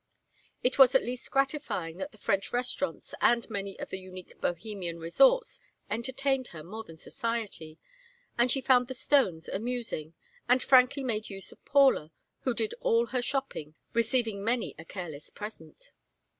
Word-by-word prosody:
It 255 Hz, +2 st, +1 dB
was 265 Hz, -1 st, +8 dB
at 265 Hz, -, +5 dB
least 245 Hz, +1 st, -4 dB
gratifying 270 Hz, -, -1 dB
that -, -, -4 dB
the 215 Hz, -, -18 dB
French 195 Hz, -1 st, 0 dB
restaurants 250 Hz, +3 st, -1 dB
and 235 Hz, -1 st, +4 dB
many 200 Hz, -2 st, -3 dB
of -, -, -6 dB
the 190 Hz, -, -3 dB
unique 185 Hz, -1 st, -10 dB
Bohemian 175 Hz, -1 st, -3 dB
resorts -, -, +4 dB, 0.3 s
entertained 260 Hz, +3 st, 0 dB
her 155 Hz, -2 st, -9 dB
more 215 Hz, +7 st, -7 dB
than 165 Hz, -6 st, -13 dB
society; 210 Hz, -7 st, -4 dB, 0.6 s
and 240 Hz, +1 st, +3 dB
she 270 Hz, +2 st, +2 dB
found 250 Hz, -2 st, +4 dB
the 260 Hz, -, -5 dB
Stones 215 Hz, -, +2 dB
amusing, 220 Hz, -8 st, -3 dB, 0.3 s
and 250 Hz, +1 st, +5 dB
frankly 260 Hz, +1 st, +5 dB
made 220 Hz, -4 st, -2 dB
use 195 Hz, -1 st, -6 dB
of -, -, -18 dB
Paula, 270 Hz, -, +4 dB, 0.3 s
who 255 Hz, -3 st, -1 dB
did 225 Hz, -2 st, -1 dB
all 230 Hz, +1 st, +3 dB
her 250 Hz, -, +2 dB
shopping, 240 Hz, -, -3 dB, 0.2 s
receiving 230 Hz, -3 st, +1 dB
many 235 Hz, +2 st, 0 dB
a 160 Hz, -, -9 dB
careless 165 Hz, -6 st, -6 dB
present. 205 Hz, -7 st, -9 dB
230 Hz, 155 wpm, -29 LUFS, 185-255 Hz, 0.6 s, was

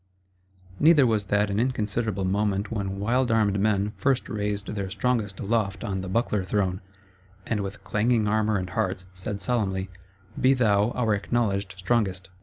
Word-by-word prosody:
Neither 155 Hz, -3 st, +6 dB
was 110 Hz, -4 st, +1 dB
that 105 Hz, +1 st, +1 dB
an 100 Hz, -, 0 dB
inconsiderable 110 Hz, -4 st, -1 dB
moment 100 Hz, +2 st, 0 dB
when 100 Hz, -3 st, -3 dB
wild 120 Hz, +5 st, +1 dB
armed 105 Hz, -3 st, +2 dB
men 105 Hz, 0 st, +1 dB
first 135 Hz, -2 st, +1 dB
raised 105 Hz, -1 st, -2 dB
their 100 Hz, -2 st, -3 dB
Strongest 110 Hz, -3 st, -1 dB
aloft 105 Hz, -1 st, -1 dB
on 95 Hz, -4 st, -2 dB
the 95 Hz, -, -6 dB
buckler 105 Hz, -1 st, 0 dB
throne, 95 Hz, -1 st, -1 dB, 0.6 s
and 110 Hz, -, -1 dB
with 100 Hz, 0 st, -5 dB
clanging 110 Hz, +2 st, +1 dB
armour 110 Hz, 0 st, +2 dB
and 95 Hz, -1 st, -4 dB
hearts, 95 Hz, -4 st, -2 dB
said 95 Hz, +2 st, -5 dB
solemnly: 95 Hz, -5 st, -1 dB, 0.5 s
Be 130 Hz, +2 st, +4 dB
thou 105 Hz, -4 st, +3 dB
our 115 Hz, -4 st, +1 dB
Acknowledged 100 Hz, -2 st, -1 dB
Strongest! 95 Hz, -2 st, -1 dB
105 Hz, 155 wpm, -26 LUFS, 95-115 Hz, 0.6 s, Neither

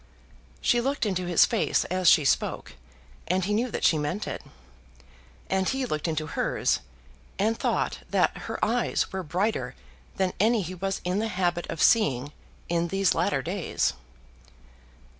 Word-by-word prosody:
She 240 Hz, -, +3 dB
looked 275 Hz, 0 st, -1 dB
into 185 Hz, -3 st, -1 dB
his 175 Hz, -2 st, +5 dB
face -, -, +1 dB
as 185 Hz, -1 st, +3 dB
she 155 Hz, -4 st, +5 dB
spoke, -, -, 0 dB, 0.5 s
and 185 Hz, 0 st, +1 dB
he 205 Hz, -, 0 dB
knew 235 Hz, +4 st, +1 dB
that -, -, -4 dB
she 155 Hz, -, +4 dB
meant 150 Hz, +8 st, -2 dB
it. -, -, -4 dB, 1.1 s
And 190 Hz, 0 st, +1 dB
he 265 Hz, 0 st, -1 dB
looked 155 Hz, -8 st, -2 dB
into 155 Hz, -1 st, -1 dB
hers, 150 Hz, -, 0 dB, 0.6 s
and 220 Hz, +3 st, +1 dB
thought -, -, -1 dB
that -, -, +2 dB
her -, -, -3 dB
eyes -, -, 0 dB
were 190 Hz, -, -2 dB
brighter 185 Hz, +7 st, -1 dB, 0.4 s
than 190 Hz, -1 st, +1 dB
any 220 Hz, +1 st, +3 dB
he 180 Hz, +2 st, -6 dB
was 195 Hz, +2 st, -3 dB
in 180 Hz, +3 st, 0 dB
the 220 Hz, -, 0 dB
habit 175 Hz, -4 st, -1 dB
of 165 Hz, -, -1 dB
seeing 145 Hz, -, +3 dB, 0.3 s
in 170 Hz, 0 st, 0 dB
these 195 Hz, +1 st, +2 dB
latter -, -, 0 dB
days. -, -, -1 dB
185 Hz, 160 wpm, -27 LUFS, 170-210 Hz, 1.1 s, his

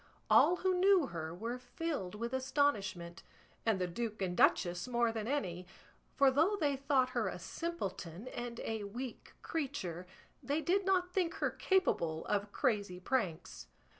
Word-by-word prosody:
All 355 Hz, -, +7 dB
who 370 Hz, +1 st, +1 dB
knew 380 Hz, -4 st, +5 dB
her 160 Hz, -8 st, -5 dB
were 230 Hz, +8 st, -4 dB
filled 250 Hz, -, -4 dB
with 235 Hz, +3 st, -4 dB
astonishment, 205 Hz, -11 st, 0 dB, 0.5 s
and 220 Hz, -3 st, +4 dB
the 180 Hz, -, +1 dB
duke 220 Hz, +4 st, -4 dB
and 185 Hz, -2 st, -1 dB
duchess 175 Hz, +3 st, +3 dB
more 240 Hz, -2 st, +2 dB
than 220 Hz, -1 st, -4 dB
any; 185 Hz, -10 st, -2 dB, 0.5 s
for 275 Hz, -2 st, +5 dB
though 320 Hz, +10 st, +3 dB
they 290 Hz, -4 st, +2 dB
thought 270 Hz, -1 st, +2 dB
her -, -, 0 dB
a -, -, -3 dB
simpleton 200 Hz, -, -5 dB
and 240 Hz, -1 st, -5 dB
a 220 Hz, -2 st, -3 dB
weak 240 Hz, +4 st, -7 dB
creature, 185 Hz, -, -3 dB, 0.3 s
they 285 Hz, +3 st, 0 dB
did 370 Hz, +4 st, +1 dB
not 360 Hz, -2 st, +2 dB
think 360 Hz, -3 st, 0 dB
her -, -, 0 dB
capable 170 Hz, -, +1 dB
of 205 Hz, 0 st, -1 dB
crazy 205 Hz, -6 st, 0 dB
pranks. 180 Hz, -, -2 dB
235 Hz, 155 wpm, -34 LUFS, 185-290 Hz, 0.5 s, All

